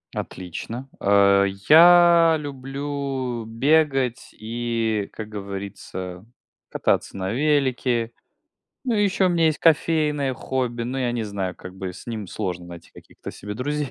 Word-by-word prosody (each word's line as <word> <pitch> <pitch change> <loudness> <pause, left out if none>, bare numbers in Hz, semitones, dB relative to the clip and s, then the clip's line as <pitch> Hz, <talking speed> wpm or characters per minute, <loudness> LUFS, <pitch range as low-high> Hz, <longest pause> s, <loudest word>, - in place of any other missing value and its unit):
Отлично. 115 +9 -6
А, 100 0 +4
я 165 - +6
люблю 135 -3 -4
бегать, 135 +1 +1
и, 115 -2 -2
как 110 -1 -7
говорится, 95 -2 -7 0.4
кататься - - 0
на 95 0 -3
велике. 130 -4 +1 0.7
Ну, 245 -3 0
ещё 200 -2 +2
у - - +3
меня 170 -2 +2
есть 155 -1 +1
кофейное 150 -4 +2
хобби, 125 -2 -3
но 125 +3 -3
я 125 -2 0
не 120 -1 -2
знаю, 100 -3 -4
как 90 0 -11
бы, 95 -2 -5
с - - -13
ним 110 -3 -4
сложно 90 -1 -4
найти 85 -1 -12
каких-то - - -11
себе 105 +1 -8
друзей, 145 +5 -2
120 Hz, 135 wpm, -23 LUFS, 100-145 Hz, 0.7 s, я